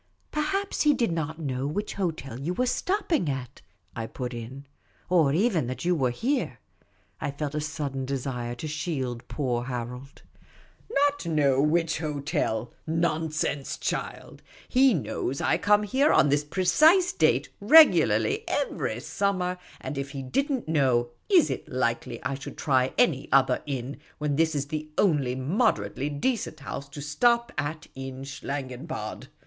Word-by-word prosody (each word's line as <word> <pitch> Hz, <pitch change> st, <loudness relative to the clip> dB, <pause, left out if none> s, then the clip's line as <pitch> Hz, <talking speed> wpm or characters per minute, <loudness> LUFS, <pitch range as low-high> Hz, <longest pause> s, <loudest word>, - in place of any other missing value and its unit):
" -, -, -39 dB
Perhaps 390 Hz, +6 st, -1 dB
he 295 Hz, -1 st, +5 dB
did 235 Hz, -8 st, +1 dB
n't 160 Hz, -1 st, -2 dB
know 135 Hz, -4 st, -2 dB
which 205 Hz, +8 st, -3 dB
hotel 155 Hz, -, -3 dB
you 165 Hz, +6 st, -2 dB
were 250 Hz, -, +1 dB
stopping 340 Hz, -, 0 dB
at," 135 Hz, -2 st, -5 dB, 0.3 s
I 115 Hz, -1 st, -4 dB
put 125 Hz, 0 st, -5 dB
in, 125 Hz, +4 st, -7 dB, 0.2 s
" -, -, -35 dB
Or 160 Hz, -6 st, +4 dB
even 175 Hz, -, +2 dB
that 130 Hz, +6 st, -5 dB
you 180 Hz, -, +3 dB
were 135 Hz, -7 st, +1 dB
here." 255 Hz, -, -1 dB, 0.6 s
I -, -, -2 dB
felt 145 Hz, +1 st, -4 dB
a 150 Hz, -, -1 dB
sudden 145 Hz, -4 st, -3 dB
desire 125 Hz, -3 st, -3 dB
to 140 Hz, +6 st, -6 dB
shield 135 Hz, -6 st, -3 dB
poor 125 Hz, -4 st, -2 dB
Harold. 125 Hz, +2 st, -6 dB, 0.3 s
'* -, -, -29 dB, 0.2 s
Not 290 Hz, -9 st, -1 dB
know 140 Hz, -4 st, +3 dB
which 160 Hz, +2 st, +1 dB
hotel? 140 Hz, -7 st, -2 dB
Nonsense, 160 Hz, -3 st, -1 dB
child; -, -, -4 dB, 0.3 s
he 260 Hz, -3 st, +5 dB
knows 140 Hz, -2 st, -2 dB
I -, -, +1 dB
come 210 Hz, 0 st, +4 dB
here 265 Hz, +8 st, +3 dB
on 145 Hz, -, +5 dB
this 145 Hz, +1 st, +2 dB
precise 310 Hz, -, +4 dB
date 145 Hz, -3 st, +2 dB
regularly 320 Hz, -, +6 dB
every -, -, -1 dB
sumiver; 185 Hz, -2 st, -1 dB, 0.2 s
and 145 Hz, -, -5 dB
if 140 Hz, 0 st, -4 dB
he 135 Hz, -1 st, -5 dB
did 275 Hz, -, 0 dB
n't 260 Hz, -, -2 dB
know, 130 Hz, -6 st, +2 dB, 0.2 s
is 365 Hz, -7 st, +5 dB
it -, -, -5 dB
likely 120 Hz, -2 st, -1 dB
I -, -, -1 dB
should 135 Hz, 0 st, -7 dB
try 130 Hz, -3 st, +2 dB
any 155 Hz, -, +2 dB
other 135 Hz, -2 st, +4 dB
inn, 135 Hz, -1 st, -4 dB, 0.2 s
when 150 Hz, -1 st, -1 dB
this 160 Hz, +1 st, +2 dB
is 140 Hz, 0 st, -2 dB
the 155 Hz, 0 st, -4 dB
only 145 Hz, -10 st, +2 dB
moderately 140 Hz, -, 0 dB
decent 155 Hz, -, -2 dB
house 140 Hz, 0 st, -6 dB
to 145 Hz, +1 st, -8 dB
stop 235 Hz, +11 st, +2 dB
at 155 Hz, 0 st, -3 dB
in 135 Hz, 0 st, -7 dB
Schlangenbad 135 Hz, -3 st, -5 dB
150 Hz, 160 wpm, -27 LUFS, 135-180 Hz, 0.6 s, regularly